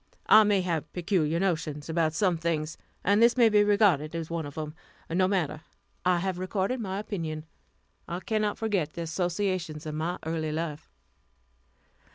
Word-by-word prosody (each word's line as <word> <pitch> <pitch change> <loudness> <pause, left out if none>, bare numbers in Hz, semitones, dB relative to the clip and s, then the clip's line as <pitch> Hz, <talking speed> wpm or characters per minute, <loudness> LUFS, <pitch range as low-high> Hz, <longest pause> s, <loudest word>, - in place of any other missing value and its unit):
I 215 0 +8
may 205 -2 +3
have 160 -4 -2
peculiar 170 -3 +1
notions 160 -6 -1
about 160 -1 +1
some 180 +1 +2
things, 160 -1 -2 0.3
and 205 +3 +3
this 235 +2 +5
may 235 -2 +6
be 210 -1 +5
regarded 195 -7 +3
as 165 -1 -4
one 165 -3 -2
of 145 - -10
them. 155 -1 -4 0.4
No 185 +2 +3
matter, 175 -6 -1 0.4
I 180 -1 +3
have 185 0 -2
recorded 195 +6 -1
my 195 -4 -3
opinion. 165 -7 -4 0.6
I 175 - -3
cannot 215 -1 0
forget 195 -9 -1
the 170 - -4
associations 175 -2 -2
of 155 - -4
my 160 +3 -2
early 160 -1 -2
life. 155 -1 -4
170 Hz, 165 wpm, -28 LUFS, 155-195 Hz, 0.6 s, I